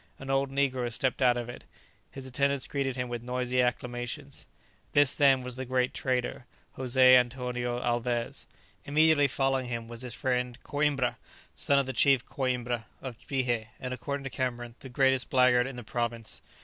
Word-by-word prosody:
An 135 0 -5
old 135 0 +1
negro 130 -3 0
stepped 130 +3 -1
out 125 -1 +4
of 120 -1 -4
it. 120 - -9 0.5
His 135 -1 -9
attendants 140 +1 0
greeted 135 -2 -2
him 125 -1 -2
with 120 -1 -4
noisy 125 +1 0
acclamations. 125 +3 -3 0.5
This, 145 -2 +5
then, 135 -3 +4
was 125 0 -6
the 130 - -3
great 125 0 0
trader, 125 -1 -2 0.3
José 130 0 +5
Antonio 125 -1 0
Alvez. 120 -1 -2 0.4
Immediately 150 0 +4
following 135 -1 0
him 115 -1 -4
was 115 0 -7
his 125 -1 -5
friend 125 -2 -1
Coïmbra, 145 -4 0 0.4
son 140 - +2
of 140 - +3
the 130 - -4
chief 135 +1 +4
Coïmbra 125 -3 -2
of 125 -4 -8
Bihé, 120 -5 -1
and, 125 0 -4
according 140 +2 -4
to 135 - -5
Cameron, 120 -1 -3
the 130 - -10
greatest 130 0 +2
blackguard 125 -3 +4
in 135 - -7
the 125 - -7
province. 115 0 -3
125 Hz, 170 wpm, -29 LUFS, 120-135 Hz, 0.5 s, This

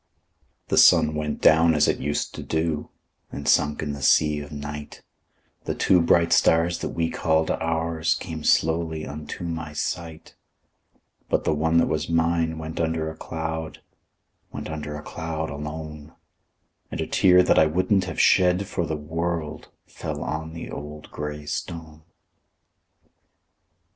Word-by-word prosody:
The - - +4
sun 75 - +6
went 75 -1 -3
down 80 0 +5
as 75 0 +4
it - - +1
used 75 +2 -2
to - - -7
do, 80 -1 -2 0.4
And - - -6
sunk 75 0 +2
in 75 -1 -3
the 70 - -7
sea 75 +2 +4
of 70 0 -9
night; 75 0 -7 0.6
The - - -2
two 90 -2 +4
bright 85 0 +3
stars 85 +1 +3
that - - -3
we 80 0 -1
called 80 -1 +1
ours 80 0 0
Came 80 -4 -6
slowly 80 0 +1
unto 75 +4 -7
my 80 -3 -4
sight; 80 +1 -5 1.0
But - - +1
the - - +1
one 80 +2 +1
that 85 - +5
was 80 - -2
mine 85 -1 +1
went 80 0 -6
under 80 -1 -1
a - - -11
cloud— 80 0 -5 0.7
Went - - -6
under 75 -1 -5
a 75 - -7
cloud, 80 -1 -4
alone; 75 +1 -7 0.8
And - - -6
a - - -1
tear 90 -1 +5
that - - +4
I 80 - +5
wouldn't 95 +4 +1
have 95 - -5
shed 90 +1 +4
for 85 -3 -2
the 80 -1 -2
world, 80 0 -4 0.2
Fell - - -6
down - - -4
on 80 0 -4
the 85 - -7
old 75 +1 -8
gray 75 0 -5
stone. 80 0 -6
80 Hz, 155 wpm, -24 LUFS, 75-85 Hz, 1.0 s, sun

